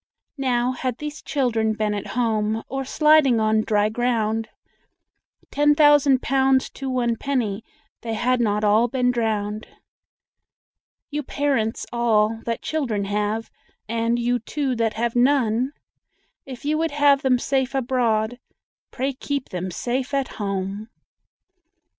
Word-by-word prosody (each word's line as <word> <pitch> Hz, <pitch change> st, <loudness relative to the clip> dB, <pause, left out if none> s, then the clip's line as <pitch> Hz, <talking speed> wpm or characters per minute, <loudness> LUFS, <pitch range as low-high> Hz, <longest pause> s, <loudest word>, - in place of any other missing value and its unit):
Now, 250 Hz, -2 st, +1 dB
had 255 Hz, -1 st, -3 dB
these 300 Hz, 0 st, -6 dB
children 230 Hz, -6 st, 0 dB
been 215 Hz, -1 st, -1 dB
at 205 Hz, -, -4 dB
home, 220 Hz, -2 st, 0 dB
Or 270 Hz, 0 st, -3 dB
sliding 300 Hz, -3 st, +4 dB
on 215 Hz, 0 st, +2 dB
dry 210 Hz, -1 st, +1 dB
ground, 225 Hz, -1 st, -1 dB, 1.0 s
Ten 295 Hz, +1 st, +3 dB
thousand 290 Hz, -3 st, +5 dB
pounds 265 Hz, -1 st, +2 dB
to 270 Hz, -1 st, -6 dB
one 240 Hz, -2 st, 0 dB
penny 230 Hz, -7 st, -2 dB, 0.4 s
They 225 Hz, -2 st, -3 dB
had 250 Hz, +2 st, +1 dB
not 210 Hz, -2 st, 0 dB
all 215 Hz, +3 st, +4 dB
been 250 Hz, 0 st, +1 dB
drowned. 215 Hz, -3 st, -2 dB, 1.4 s
You 295 Hz, +1 st, -2 dB
parents 270 Hz, -6 st, -1 dB
all 225 Hz, -2 st, +2 dB
that 230 Hz, -1 st, -3 dB
children 240 Hz, -10 st, -1 dB
have, 210 Hz, +2 st, -2 dB, 0.4 s
And 230 Hz, +1 st, 0 dB
you 240 Hz, +1 st, 0 dB
too 265 Hz, +2 st, -2 dB
that 225 Hz, -1 st, 0 dB
have 235 Hz, +1 st, -1 dB
none, 250 Hz, -1 st, +2 dB, 0.8 s
If 260 Hz, 0 st, -9 dB
you 305 Hz, +1 st, +1 dB
would 325 Hz, 0 st, +1 dB
have 285 Hz, -1 st, +3 dB
them 260 Hz, -2 st, +3 dB
safe 265 Hz, +1 st, -1 dB
abroad 245 Hz, -3 st, 0 dB, 0.5 s
Pray 270 Hz, +2 st, -2 dB
keep 280 Hz, 0 st, -4 dB
them 185 Hz, 0 st, -4 dB
safe 255 Hz, +9 st, -2 dB
at 275 Hz, -2 st, 0 dB
home. 200 Hz, +2 st, -3 dB
240 Hz, 135 wpm, -23 LUFS, 220-270 Hz, 1.4 s, thousand